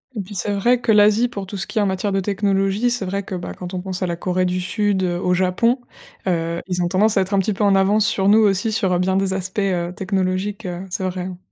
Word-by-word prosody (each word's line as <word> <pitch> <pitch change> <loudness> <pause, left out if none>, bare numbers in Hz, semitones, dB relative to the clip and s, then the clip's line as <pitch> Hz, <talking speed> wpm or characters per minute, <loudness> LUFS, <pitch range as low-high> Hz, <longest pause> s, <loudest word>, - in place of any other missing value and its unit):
Et - - -3
puis 195 +2 -10
c'est 200 +3 -2
vrai 235 +5 +2
que 225 - +2
l'Asie, 215 +3 +4
pour 200 -4 -6
tout 200 - -7
ce 190 - -2
qui 220 - -2
est - - +3
en 205 - +2
matière 190 +1 -1
de 195 - +1
technologie, 200 +2 +1
c'est 240 -5 -1
vrai 195 +2 -2
que 195 - -8
bah, 175 - -5
quand 180 0 -8
on 185 - -2
pense 185 0 -4
à - - 0
la 170 -1 -3
Corée 185 +1 0
du 180 0 -1
Sud, 200 +1 0
heu, 175 -1 0
au 180 - +1
Japon, 190 +8 +2 0.5
heu, 170 -1 -1
ils 180 -1 -1
ont 175 - 0
tendance 205 +4 +2
à 195 - +4
être 190 +2 -3
un 200 - +3
petit 200 +2 0
peu 205 - -2
en 200 -1 +4
avance 200 +2 +3
sur 195 -1 +1
nous 210 +2 +6
aussi, 210 +1 +2
sur, 195 -4 +1
heu, 175 - +1
bien 185 +1 +1
des 195 0 +1
aspects, 190 +2 -3
heu, 180 -3 -1
technologiques, 190 +2 -2
heu, 175 -1 -4
c'est 185 - -3
vrai 185 0 -5
hein. 180 0 -6
195 Hz, 285 wpm, -21 LUFS, 185-205 Hz, 0.5 s, nous